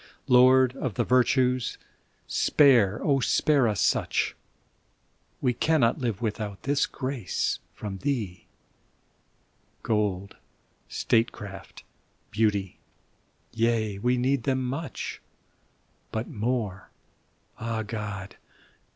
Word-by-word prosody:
Lord 130 +1 +6
of 125 -8 -3
the - - +1
virtues, 125 0 +2 0.5
spare, 120 -9 +4 0.2
spare 140 -1 +3
us 105 -3 -1
such! - - +1 1.1
We 125 -2 +2
cannot 130 -2 +2
live 115 -4 -2
without 105 -2 -3
this 140 +1 +1
grace 130 -6 -2 0.2
from 100 -3 -6
thee; 110 -10 -3 1.4
Gold, 100 -3 -1 0.5
statecraft, 105 -4 -2 0.5
beauty 105 -3 0 0.4
— - - -41
^yea, 110 -3 0
we 125 +2 +2
need 130 +2 +1
them 130 0 0
much, 140 +4 -5 0.9
But 110 +2 -3
more 105 -3 -3 0.3
— - - -34
^ah, 110 -1 -2
God! 105 -3 -6
115 Hz, 95 wpm, -27 LUFS, 105-130 Hz, 1.4 s, Lord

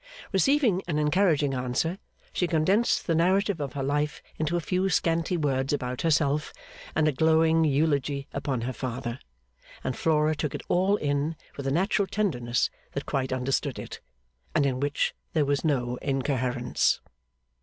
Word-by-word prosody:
Receiving 230 -1 +3
an 155 -3 -1
encouraging 150 -2 +2
answer, 130 +8 -1 0.3
she 180 - +1
condensed 185 +8 +2
the 165 - +1
narrative 185 +2 +2
of 140 -3 -4
her 140 - -3
life 145 +2 -1 0.2
into 160 +2 0
a - - +1
few 185 +3 0
scanty 170 0 +1
words 135 -3 0
about 125 -3 -2
herself 150 -2 +1 0.4
and 155 0 +3
a - - +4
glowing 160 +2 +3
eulogy 140 -1 +1
upon 130 -4 -2
her 125 +2 -3
father; 120 0 -4 0.6
and 130 - -2
Flora 155 -1 +2
took 150 -2 -3
it - - -6
all 190 +3 +3
in 145 -1 -1 0.2
with 140 -1 -5
a - - +1
natural 190 +5 +1
tenderness 125 - 0 0.2
that 140 - -3
quite 135 -2 -1
understood 130 +1 -1
it, - - -7 0.6
and 150 - +4
in 130 -2 0
which 145 +1 0 0.2
there 155 -3 +2
was 140 0 0
no 125 -6 0
incoherence. 130 -3 0
150 Hz, 155 wpm, -27 LUFS, 135-165 Hz, 0.6 s, a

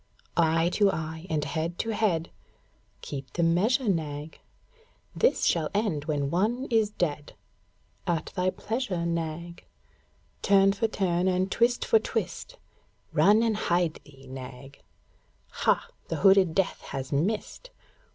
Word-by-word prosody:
Eye 165 0 +3
to 200 +1 +3
eye 160 +1 -5
and 150 -2 0
head 160 +4 -3
to 225 - -2
head, 190 -7 0 0.7
(Keep 135 -3 -7
the 170 - 0
measure, 215 +10 +2
Nag.) 155 -4 -2 0.8
This - - +2
shall 160 -3 +2
end 195 -9 0
when 145 -3 -1
one 225 +9 0
is 220 -2 +3
dead; 155 -7 -3 0.7
(At 170 -2 -1
thy 185 -1 +1
pleasure, 205 -4 -3
Nag.) 170 0 -4 0.8
Turn 195 0 +5
for 225 +3 0
turn 185 -4 0
and 185 +1 +1
twist 240 +1 +2
for 450 - +5
twist - - -4 0.6
(Run 210 +3 +5
and 225 -2 +1
hide 175 -5 0
thee, 135 -2 -17
Nag.) 130 +1 -10 0.7
Hah! - - +1 0.2
The - - -2
hooded 190 -4 +5
Death 195 - 0
has 135 -1 -5
missed! 205 - -2
175 Hz, 130 wpm, -27 LUFS, 155-205 Hz, 0.8 s, Turn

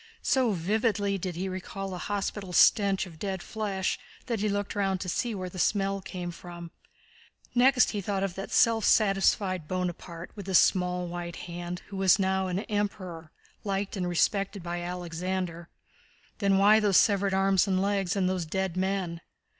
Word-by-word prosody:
So 255 -5 +2
vividly 200 +2 0
did 180 -1 -4
he 185 +3 -3
recall 190 +1 -5
that 180 - -4
hospital 195 +1 -3
stench 200 0 +4
of 165 -4 -13
dead 190 -1 -3
flesh 200 -4 -2 0.3
that 230 -4 -2
he 210 +1 0
looked 205 0 -2
round 195 -2 0
to - - -4
see 230 +5 -1
where 185 -1 -4
the 180 +1 -8
smell 195 0 +1
came 180 -2 -5
from. 175 0 -10 0.8
Next 250 +1 +5
he 205 - -3
thought 195 0 -1
of 195 -2 -2
that 195 +2 -6
self 225 -1 +3
satisfied 195 -4 +2
Bonaparte, 180 -1 -4
with 200 -3 -8
his 190 -2 +5
small 180 -1 +2
white 175 0 -5
hand, 175 0 -6
who 200 - -6
was 190 -1 +5
now 190 -1 +1
an 185 +2 -1
Emperor, 185 -6 -4 0.3
liked 200 0 -2
and 180 -2 -2
respected 195 +2 0
by 175 0 -3
Alexander. 175 0 -4 0.7
Then 195 -2 +3
why 205 +2 +6
those 205 -3 +3
severed 200 -2 +3
arms 195 0 +3
and 190 -1 +1
legs 195 0 0
and 190 -2 +1
those 185 -3 -1
dead 190 +1 -2
men?... 185 -3 -1
190 Hz, 170 wpm, -28 LUFS, 180-200 Hz, 0.8 s, why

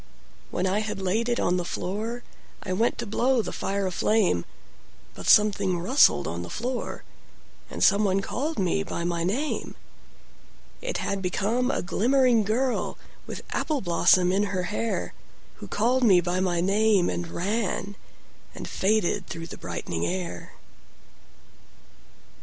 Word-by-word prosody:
When 180 - -1
I 190 +2 +1
had 215 -2 -3
laid 210 +6 0
it 240 - +1
on 180 +1 +1
the 180 - -1
floorI 220 +7 -4 0.5
went 225 +6 +1
to - - -4
blow 240 +3 +1
the - - -4
fire 200 0 -2
a 185 - -1
flame, 185 - +2 0.7
But - - -8
something 200 -3 +4
rustled 180 - +4
on 85 +1 -4
the 85 - -7
floor, 245 +2 -4 0.7
And - - -3
someone 200 -1 +4
called 300 +10 -3
me 195 0 +1
by 185 -3 -4
my 170 -1 -1
name:It 285 - -6
had 200 -1 -2
become 215 +7 0
a - - -1
glimmering 245 +4 +3
girlWith 245 +5 -3
apple 300 -3 -1
blossom 180 0 +4
in 200 +2 +2
her 185 -3 -2
hairWho 230 +2 -6
called 250 +4 +1
me 195 -6 +6
by 175 +1 -1
my 175 -2 +1
name 200 0 +3
and 175 - -2
ranAnd 200 +2 -2 0.7
faded 200 -2 0
through 165 0 -6
the 165 - -9
brightening 85 -1 -3
air. 90 -1 -5
200 Hz, 135 wpm, -26 LUFS, 180-230 Hz, 0.7 s, me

